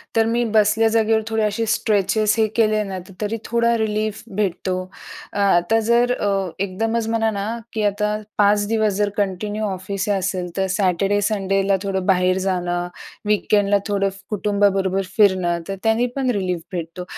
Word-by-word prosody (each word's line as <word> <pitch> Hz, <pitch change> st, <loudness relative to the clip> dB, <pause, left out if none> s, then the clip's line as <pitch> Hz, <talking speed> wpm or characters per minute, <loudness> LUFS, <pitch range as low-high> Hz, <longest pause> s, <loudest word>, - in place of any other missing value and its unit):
तर 225 Hz, -, +4 dB
मी 235 Hz, +2 st, +1 dB
बसल्या 215 Hz, +1 st, +4 dB
जागेवर 220 Hz, 0 st, +3 dB
थोडे 220 Hz, -1 st, 0 dB
असे 215 Hz, +2 st, 0 dB
स्ट्रेचेस 215 Hz, -1 st, +1 dB
हे 220 Hz, -, +4 dB
केले 215 Hz, -2 st, +2 dB
ना, 195 Hz, -2 st, -5 dB, 0.2 s
तरी 215 Hz, +2 st, -1 dB
थोडा 235 Hz, 0 st, +2 dB
रिलीफ 215 Hz, -1 st, -1 dB
भेटतो. 185 Hz, -2 st, -1 dB, 0.6 s
अ, -, -, -5 dB
आता 200 Hz, +2 st, +3 dB
जर 240 Hz, +1 st, +4 dB
अ, 195 Hz, -5 st, -1 dB
एकदमच 225 Hz, +4 st, -1 dB
म्हणा 225 Hz, -1 st, +1 dB
ना, 200 Hz, 0 st, -3 dB, 0.3 s
की 215 Hz, -1 st, -1 dB
आता 210 Hz, +1 st, 0 dB, 0.2 s
5 205 Hz, 0 st, +3 dB
दिवस 220 Hz, -2 st, +1 dB
जर 205 Hz, 0 st, +1 dB
कंटिन्यू 205 Hz, +2 st, -2 dB
ऑफिस 190 Hz, +1 st, -4 dB
असेल 185 Hz, -1 st, -2 dB
तर 190 Hz, 0 st, +1 dB
सॅटरडे, 195 Hz, +1 st, +1 dB
संडेला 195 Hz, -1 st, +1 dB
थोडं 190 Hz, -2 st, -2 dB
बाहेर 185 Hz, -1 st, +3 dB
जाणं, 175 Hz, -1 st, -1 dB, 0.4 s
वीकेंडला 205 Hz, -1 st, +2 dB
थोडं 195 Hz, -1 st, +1 dB
फ् 195 Hz, +1 st, -13 dB
कुटुंबाबरोबर 200 Hz, -2 st, +1 dB, 0.2 s
फिरणं, 185 Hz, -4 st, +3 dB
तर 195 Hz, -, -3 dB
त्यांनी 225 Hz, +2 st, +2 dB
पण 265 Hz, -2 st, 0 dB
रिलीफ 180 Hz, -3 st, -2 dB
भेटतो. 175 Hz, 0 st, -5 dB
205 Hz, 155 wpm, -21 LUFS, 190-220 Hz, 0.6 s, तर